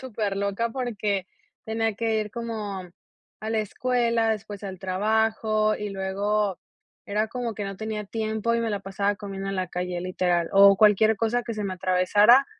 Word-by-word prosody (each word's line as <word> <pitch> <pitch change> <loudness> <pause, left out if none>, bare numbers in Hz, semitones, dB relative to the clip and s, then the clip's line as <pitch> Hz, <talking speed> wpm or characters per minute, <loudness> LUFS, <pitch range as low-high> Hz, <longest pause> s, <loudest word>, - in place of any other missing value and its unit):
superloca 210 -2 -2
porque 210 -7 -2 0.4
tenía 225 0 0
que 225 0 0
ir 210 -1 -3
como, 215 -4 -4 0.6
a 220 +1 -4
la 225 - +1
escuela, 230 +1 +1
después 210 -1 -4
al 190 -1 -6
trabajo, 215 +3 +1
y 210 0 -4
luego, 195 +1 -1 0.5
era 215 +2 -1
como 245 -2 -3
que 205 0 -5
no 195 -1 -5
tenía 215 0 -4
tiempo 220 +2 -1
y 235 - +1
me 230 -1 -1
la 205 -1 -2
pasaba 200 +1 -1
comiendo 195 -1 -5
en 195 - -3
la 185 -1 -1
calle, 180 0 -3
literal, 180 -2 0
o 200 0 +8
cualquier 215 +1 +5
cosa 230 +3 0
que 230 - -5
se 215 - -4
me 195 -2 -2
atravesara. 195 +8 +5
210 Hz, 170 wpm, -25 LUFS, 195-225 Hz, 0.6 s, o